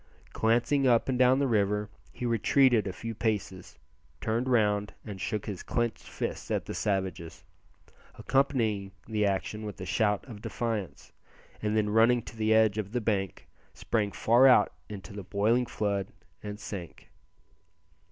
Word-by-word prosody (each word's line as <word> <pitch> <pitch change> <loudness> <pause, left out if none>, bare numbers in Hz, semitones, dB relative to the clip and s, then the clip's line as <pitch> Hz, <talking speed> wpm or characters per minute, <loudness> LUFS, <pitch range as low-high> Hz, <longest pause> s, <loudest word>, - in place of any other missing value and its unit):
Glancing 120 +5 +2
up 120 -2 +3
and 125 -1 0
down 130 +1 +5
the 140 - +2
river 105 -3 +1 0.2
he 125 - -6
retreated 120 0 +3
a - - -2
few 115 +5 -6
paces, 105 -4 -3 0.4
turned 115 +4 -1
round 105 -4 +1
and 100 -3 -7
shook 105 +2 -2
his 100 -4 -5
clenched 120 -1 -2
fist - - -4
at - - -1
the - - -5
savages, 95 -5 -3 0.7
accompanying 115 -8 0
the 105 -2 0
action 100 +2 -2
with 105 -2 -7
a 95 - -5
shout 105 +1 +1
of 110 -5 -10
defiance, 110 -6 -4 0.5
and 110 0 0
then 105 -1 +1
running 115 +2 +4
to 115 - -10
the 110 0 0
edge 110 -1 +4
of 105 0 -5
the 125 - +1
bank, 100 -5 -2 0.3
sprang 105 -3 -1
far 120 +6 +5
out 130 - +5 0.2
into 100 0 -8
the 100 -1 -7
boiling 110 +6 +1
flood 100 -4 -1 0.3
and 105 0 -7
sank. 95 -5 -8
110 Hz, 155 wpm, -29 LUFS, 100-115 Hz, 0.7 s, down